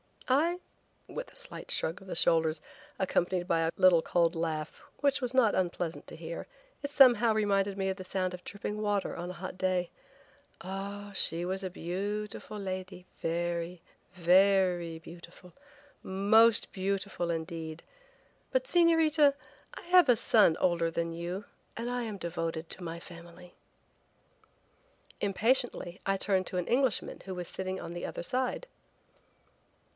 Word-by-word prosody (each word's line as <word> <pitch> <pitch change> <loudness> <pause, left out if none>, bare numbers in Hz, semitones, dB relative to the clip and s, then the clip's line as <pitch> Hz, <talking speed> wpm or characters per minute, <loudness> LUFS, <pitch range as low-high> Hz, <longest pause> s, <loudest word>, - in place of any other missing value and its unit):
"I!" 325 +7 +2 0.5
with - - -6
a - - -22
slight - - -7
shrug 165 +5 -1
of 190 - -14
the - - -4
shoulders, 160 -1 +2 0.4
accompanied 180 -1 0
by 165 - +2
a 165 0 +1
little 180 -3 +6
cold 170 0 +2
laugh, 160 -2 -3 0.2
which 280 -1 +2
was 250 0 -2
not 250 -5 +4
unpleasant 175 -2 -2
to - - -9
hear; 165 +1 -6 0.3
it 285 - -3
somehow 245 -5 +6
reminded 200 -2 +1
me 190 -1 0
of 190 - -2
the 185 - -8
sound 185 -1 -1
of 180 0 -8
dripping 205 +1 -5
water 205 -2 0
on 175 +1 -5
a - - -5
hot 185 +1 -7
day. 185 -1 0 0.7
"Ah, 200 +2 -6
she 170 -3 -1
was 190 +2 -2
a 185 - -2
beautiful 205 +5 -4
lady, 185 -2 -5 0.2
very, 170 +1 -2 0.3
ver 185 +1 +4
ry 165 -1 -6
beautiful, 170 +2 -13 0.5
most 210 +4 +4
beautiful, 195 -2 -2
indeed, 160 -1 -4 0.7
but - - +2
Señorita, 325 - +4 0.4
I - - -8
have 355 -4 +5
a 245 - +7
son 215 -7 +4
older 170 -2 +2
than 165 0 -2
you 175 +4 -4 0.3
and 235 +2 -3
I 245 0 -1
am 215 -3 -5
devoted 165 -2 -3
to 185 - -9
my 170 0 -5
family." 170 +1 -13 1.7
Impatiently 210 -2 +1
I 195 0 +1
turned 190 -1 +1
to 180 - -4
an 180 - -1
Englishman 260 -1 +1
who 190 -1 -5
was 180 -1 -5
sitting 190 0 -4
on - - -7
the 175 0 -5
other - - -5
side. 255 - -1
185 Hz, 150 wpm, -30 LUFS, 170-210 Hz, 1.7 s, a